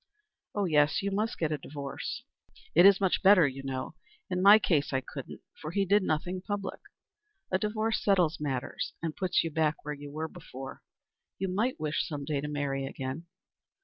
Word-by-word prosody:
"Oh 205 Hz, -1 st, +1 dB
yes, 150 Hz, -1 st, +3 dB
you 200 Hz, -, -1 dB
must 215 Hz, +3 st, -1 dB
get 160 Hz, -2 st, 0 dB
a 150 Hz, -, -1 dB
divorce. 140 Hz, 0 st, -6 dB, 0.5 s
It 175 Hz, +4 st, +8 dB
is 200 Hz, -1 st, +6 dB
much 190 Hz, -2 st, +1 dB
better, 190 Hz, -5 st, +7 dB
you 135 Hz, 0 st, -5 dB
know. 130 Hz, 0 st, -4 dB, 0.4 s
In 180 Hz, 0 st, 0 dB
my 200 Hz, +3 st, +9 dB
case 160 Hz, -9 st, +1 dB
I 135 Hz, -, +1 dB
couldn't, -, -, -8 dB, 0.2 s
for 155 Hz, -, -4 dB
he 195 Hz, +4 st, +1 dB
did 205 Hz, +3 st, +4 dB
nothing 180 Hz, +2 st, -1 dB
public. 200 Hz, 0 st, -4 dB, 0.7 s
A 185 Hz, -, +2 dB
divorce 215 Hz, +1 st, -1 dB
settles 180 Hz, -5 st, +3 dB
matters, 135 Hz, -4 st, -3 dB
and 160 Hz, -2 st, -2 dB
puts 185 Hz, -2 st, +1 dB
you 165 Hz, -, -3 dB
back 155 Hz, -1 st, 0 dB
where 150 Hz, -, -2 dB
you 145 Hz, 0 st, -9 dB
were 155 Hz, +2 st, -3 dB
before. 135 Hz, -3 st, -9 dB, 0.6 s
You 190 Hz, 0 st, -2 dB
might 220 Hz, +8 st, 0 dB
wish 155 Hz, 0 st, -1 dB
some 145 Hz, -3 st, -5 dB
day 145 Hz, -1 st, -1 dB
to 150 Hz, -, -4 dB
marry 140 Hz, -2 st, -2 dB
again." 135 Hz, +6 st, -5 dB
160 Hz, 185 wpm, -30 LUFS, 145-195 Hz, 0.7 s, my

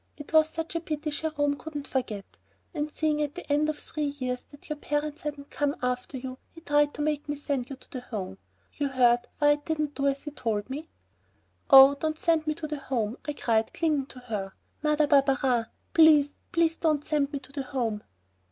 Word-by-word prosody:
It 290 Hz, +1 st, -10 dB
was 315 Hz, 0 st, +6 dB
such 325 Hz, 0 st, -5 dB
a 335 Hz, -, 0 dB
pity 305 Hz, -2 st, -3 dB
Jerome 290 Hz, -1 st, 0 dB
couldn't 295 Hz, -2 st, -6 dB
forget, 220 Hz, -7 st, -2 dB, 0.5 s
and 300 Hz, -2 st, -2 dB
seeing 305 Hz, -1 st, 0 dB
at 290 Hz, -1 st, -2 dB
the 360 Hz, -, -7 dB
end 300 Hz, +1 st, +2 dB
of 305 Hz, -, -2 dB
three 300 Hz, 0 st, -3 dB
years 250 Hz, -2 st, -2 dB
that 290 Hz, -, -15 dB
your 300 Hz, -, -3 dB
parents 295 Hz, +1 st, -2 dB
hadn't 290 Hz, -1 st, -6 dB
come 290 Hz, -1 st, 0 dB
after 250 Hz, +1 st, -2 dB
you, 255 Hz, 0 st, -7 dB
he 330 Hz, -, -14 dB
tried 295 Hz, -2 st, +2 dB
to 295 Hz, -, -2 dB
make 295 Hz, -1 st, -1 dB
me 290 Hz, -, 0 dB
send 280 Hz, -3 st, -3 dB
you 275 Hz, -, -5 dB
to -, -, -19 dB
the 255 Hz, -, -5 dB
Home. 195 Hz, -, -6 dB, 0.3 s
You 290 Hz, -, -1 dB
heard 245 Hz, -2 st, +3 dB
why 290 Hz, -1 st, +4 dB
I -, -, +5 dB
didn't 300 Hz, 0 st, -2 dB
do 280 Hz, -1 st, 0 dB
as 275 Hz, 0 st, 0 dB
he 295 Hz, -, -6 dB
told 225 Hz, -4 st, -2 dB
me?" 305 Hz, +4 st, -5 dB, 0.8 s
"Oh, 270 Hz, 0 st, +10 dB
don't 310 Hz, +2 st, -2 dB
send 320 Hz, -1 st, +1 dB
me 305 Hz, -, +1 dB
to 310 Hz, -, -6 dB
the 300 Hz, -1 st, -4 dB
Home," 240 Hz, -4 st, -2 dB
I 295 Hz, -, -2 dB
cried, 225 Hz, -5 st, 0 dB
clinging 300 Hz, -5 st, +1 dB
to 255 Hz, -, -10 dB
her, 205 Hz, -5 st, -4 dB, 0.3 s
"Mother 300 Hz, 0 st, +3 dB
Barberin, 270 Hz, -4 st, +3 dB, 0.3 s
please, 300 Hz, -3 st, +6 dB, 0.2 s
please, 335 Hz, -1 st, +2 dB
don't 305 Hz, -3 st, +1 dB
send 290 Hz, -2 st, +1 dB
me 285 Hz, -, -2 dB
to 270 Hz, -, -12 dB
the 280 Hz, 0 st, -3 dB
Home." 240 Hz, -6 st, -2 dB
290 Hz, 210 wpm, -28 LUFS, 260-305 Hz, 0.8 s, Oh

